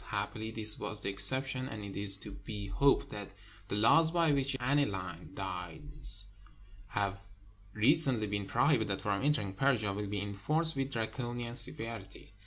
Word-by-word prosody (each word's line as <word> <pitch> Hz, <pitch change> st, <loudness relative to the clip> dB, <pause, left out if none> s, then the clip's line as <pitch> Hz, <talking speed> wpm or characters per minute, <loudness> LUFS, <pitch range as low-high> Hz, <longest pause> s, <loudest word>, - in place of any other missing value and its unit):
Happily 110 Hz, 0 st, -5 dB
this 110 Hz, -1 st, +1 dB
was 105 Hz, -, -5 dB
the -, -, 0 dB
exception, 130 Hz, +5 st, +3 dB
and 105 Hz, -1 st, -8 dB
it 100 Hz, -1 st, -8 dB
is 100 Hz, 0 st, +9 dB
to 100 Hz, +2 st, -5 dB
be 105 Hz, 0 st, -8 dB
hoped 135 Hz, +9 st, +1 dB
that 100 Hz, -1 st, -8 dB, 0.3 s
the -, -, -4 dB
laws 160 Hz, +10 st, +4 dB
by 165 Hz, -2 st, +2 dB
which 140 Hz, -1 st, 0 dB
aniline 100 Hz, -, -2 dB
dyes 100 Hz, -, -4 dB, 0.6 s
have 100 Hz, -1 st, -3 dB, 0.5 s
recently 125 Hz, 0 st, +3 dB
been 100 Hz, -1 st, -4 dB
prohibited 110 Hz, -9 st, 0 dB
from 100 Hz, -1 st, -3 dB
entering 120 Hz, -10 st, -1 dB
Persia 110 Hz, -4 st, 0 dB
will 105 Hz, +1 st, -5 dB
be 100 Hz, 0 st, -4 dB
enforced 140 Hz, -, +2 dB
with 135 Hz, 0 st, -3 dB
Draconian 120 Hz, +1 st, -5 dB
severity. 110 Hz, -4 st, -4 dB
110 Hz, 150 wpm, -31 LUFS, 100-135 Hz, 0.6 s, is